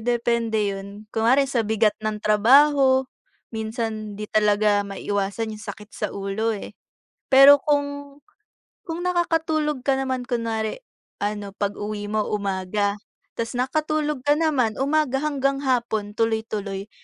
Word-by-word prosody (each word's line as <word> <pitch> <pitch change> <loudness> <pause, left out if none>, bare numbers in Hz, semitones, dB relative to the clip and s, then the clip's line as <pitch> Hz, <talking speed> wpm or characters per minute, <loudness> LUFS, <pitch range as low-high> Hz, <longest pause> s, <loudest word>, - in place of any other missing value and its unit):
depende 230 -3 0
yun. 200 +2 -9
Kunwari 245 +5 +3
sa 265 -3 0
bigat 220 -1 +2
ng 215 0 -2
trabaho, 265 +5 +5 0.5
minsan 220 -1 -4
'di 210 - -5
talaga 210 -1 +3
maiiwasan 200 +2 -3
yung 210 - -9
sakit 210 0 -9
sa - - -3
ulo, 200 +3 -2
eh. - - -8 0.5
Pero 275 +2 +8
kung 285 0 -2 0.7
kung 335 +2 -4
nakakatulog 320 -5 0
ka 275 - +3
naman 260 -2 -2
kunwari 230 - -2 0.4
ano, 205 -1 -3
pag-uwi 205 +1 -4
mo 215 0 0
umaga 200 0 -1 0.4
tas 230 +1 -3
nakatulog 300 +3 -1
ka 290 - +5
naman, 290 -8 +1
umaga 285 -1 +1
hanggang 275 -2 0
hapon 235 -6 0
tuloy-tuloy, 215 -2 -2
225 Hz, 125 wpm, -23 LUFS, 210-275 Hz, 0.7 s, Pero